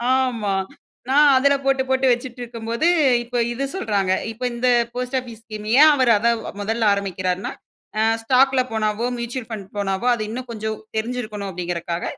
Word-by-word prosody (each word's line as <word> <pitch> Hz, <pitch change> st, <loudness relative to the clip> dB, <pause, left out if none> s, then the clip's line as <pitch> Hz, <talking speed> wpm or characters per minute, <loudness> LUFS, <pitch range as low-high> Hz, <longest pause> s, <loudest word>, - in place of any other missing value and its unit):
ஆமா. 240 Hz, -6 st, 0 dB, 0.6 s
நான் 290 Hz, +2 st, +6 dB
அதுல 280 Hz, +2 st, +4 dB
போட்டு, 270 Hz, -1 st, +2 dB
போட்டு 265 Hz, 0 st, +2 dB
வச்சிட்டிருக்கும் 240 Hz, -2 st, -4 dB
போது, 235 Hz, +9 st, +1 dB, 0.4 s
இப்போ 245 Hz, +1 st, -4 dB, 0.2 s
இது 260 Hz, +3 st, -3 dB
சொல்றாங்க. 200 Hz, -, 0 dB, 0.2 s
இப்போ 235 Hz, +3 st, -9 dB
இந்த 250 Hz, +1 st, +1 dB, 0.3 s
post 250 Hz, +1 st, -4 dB
office 235 Hz, -3 st, -10 dB
ஸ்கீம் 215 Hz, -1 st, -8 dB
ஏன் 310 Hz, +1 st, +9 dB
அவர் 255 Hz, -4 st, +2 dB
அதை 235 Hz, +3 st, +2 dB, 0.3 s
முதலில் 225 Hz, +2 st, -1 dB
ஆரம்பிக்கிறார்ன்னா, 190 Hz, -2 st, -2 dB, 0.5 s
"அ -, -, +3 dB, 0.2 s
ஸ்டாக் 265 Hz, +3 st, +4 dB
ல -, -, +5 dB
போனாவோ, 215 Hz, +1 st, -1 dB
மியூச்சுவல் 235 Hz, 0 st, -5 dB
ஃபண்ட் 200 Hz, -4 st, -7 dB
போனாவோ, 195 Hz, +3 st, -1 dB
அது 220 Hz, -3 st, -2 dB
இன்னும் 245 Hz, +2 st, -6 dB
கொஞ்சம் 220 Hz, -1 st, -4 dB, 0.2 s
தெரிஞ்சிருக்கணும்." 220 Hz, -3 st, -3 dB
அப்படீங்கறக்காக, 175 Hz, -1 st, -4 dB
230 Hz, 160 wpm, -21 LUFS, 210-255 Hz, 0.6 s, ஏன்